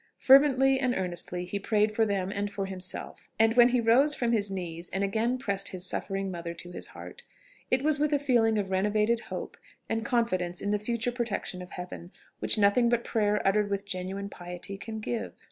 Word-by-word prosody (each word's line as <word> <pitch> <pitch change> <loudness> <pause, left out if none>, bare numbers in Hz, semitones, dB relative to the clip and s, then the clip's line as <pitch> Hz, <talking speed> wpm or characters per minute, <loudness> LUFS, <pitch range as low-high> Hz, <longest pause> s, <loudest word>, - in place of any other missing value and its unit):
Fervently 270 -1 +5
and 255 -2 0
earnestly 180 -1 -1
he 200 +3 -3
prayed 215 +1 +1
for 220 +1 +2
them 195 -2 -1
and 205 +1 -2
for 200 -1 -4
himself; 185 -2 -4
and 225 +1 +4
when 240 0 +7
he 250 0 +2
rose 255 +6 +4
from 240 -2 0
his 205 -3 +1
knees 175 -3 -5
and 195 +1 -2
again 225 +5 0
pressed 200 -6 -1
his 185 -1 -3
suffering 195 0 -2
mother 170 -1 -6
to 175 +1 -9
his - - -6
heart, 485 - -11 0.5
it 255 +1 +2
was 300 -1 +2
with 300 0 +1
a 290 - +3
feeling 240 -6 +2
of 195 -2 -2
renovated 210 +4 +1
hope - - -7 0.3
and 225 0 -1
confidence 185 -8 0
in 205 - -2
the 210 - +1
future 235 +2 -1
protection 235 -6 -3
of 180 - -9
Heaven 180 0 -8 0.3
which - - +4
nothing 210 +4 +4
but 235 0 +1
prayer 210 -2 0
uttered 205 +1 +2
with 200 0 -2
genuine 195 +1 -4
piety 180 +1 -7
can 220 +2 -7
give. 230 +1 -4
210 Hz, 200 wpm, -28 LUFS, 190-235 Hz, 0.5 s, when